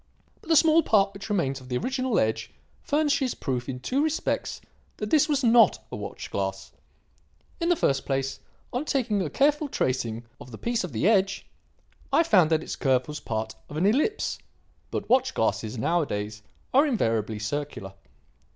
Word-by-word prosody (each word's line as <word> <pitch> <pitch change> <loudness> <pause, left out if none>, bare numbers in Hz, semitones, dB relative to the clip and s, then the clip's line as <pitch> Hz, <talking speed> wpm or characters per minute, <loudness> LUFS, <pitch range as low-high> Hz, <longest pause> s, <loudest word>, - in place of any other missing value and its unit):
But - - -15
the 325 - +5
small 320 +1 +6
part 200 -7 +3
which 195 +2 -9
remains 140 -10 0
of 130 - -13
the 125 - 0
original 255 - -1
edge 110 0 0 0.3
furnishes 290 -3 +1
proof 125 -3 -3
in 125 -1 -4
two 260 - 0
respects 315 0 -1 0.4
that 210 0 -4
this 310 0 +4
was 285 -2 +1
not 230 -3 +6
a - - -4
watch - - -7
glass. 95 0 -3 0.9
In 335 0 0
the 350 - +4
first 135 - +1
place, 135 0 -1 0.3
on 250 +4 -1
taking 230 -9 0
a 165 - -2
careful 295 - +2
tracing 120 - -1 0.2
of - - -11
this 110 - -10
piece 235 -2 -1
of 180 - -5
the 115 - 0
edge, 195 -3 +2 0.7
I 305 +5 +5
found 185 - +4
that 160 -1 +1
its - - -5
curve 130 -2 +1
was 150 0 -5
part 110 -1 -3 0.2
of 150 - -6
an 170 - +1
ellipse; 295 - +1 0.5
but - - -4
watch 260 +1 +2
glasses, 110 +1 -1
nowadays, 110 -7 -1 0.3
are 280 +4 +5
invariably 115 - 0
circular. 110 -3 -4
180 Hz, 175 wpm, -26 LUFS, -, 0.9 s, small